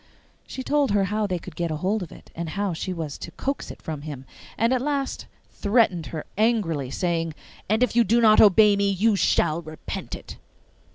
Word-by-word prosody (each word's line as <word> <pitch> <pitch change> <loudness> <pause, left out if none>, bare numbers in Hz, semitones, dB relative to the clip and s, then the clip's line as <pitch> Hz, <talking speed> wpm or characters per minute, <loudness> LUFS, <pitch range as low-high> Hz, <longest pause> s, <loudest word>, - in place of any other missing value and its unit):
She 260 - -6
told 290 0 +2
her 200 -1 +2
how 210 +2 0
they 185 -2 -1
could 170 -1 -10
get 170 0 -2
hold 185 +7 -1
of 175 - -7
it, - - -15
and 170 -1 -4
how 200 +2 -2
she 185 +3 -4
was 160 -5 -5
to - - -7
coax 275 +1 -4
it - - -11
from 155 -3 -5
him, 145 -3 -7 0.3
and 230 +4 +2
at 255 - +1
last 280 -1 -2 0.2
threatened 205 -6 +2
her 155 -2 -6
angrily, 190 - +1
saying, 165 0 -1 0.3
'And 220 +4 +3
if 250 - 0
you 240 - +6
do 230 +3 +3
not 215 -2 +6
obey 210 0 +6
me, 200 0 +1
you 200 +3 +2
shall 165 -3 +2
repent 155 -1 -6
it! - - -10
200 Hz, 205 wpm, -24 LUFS, 165-225 Hz, 0.3 s, you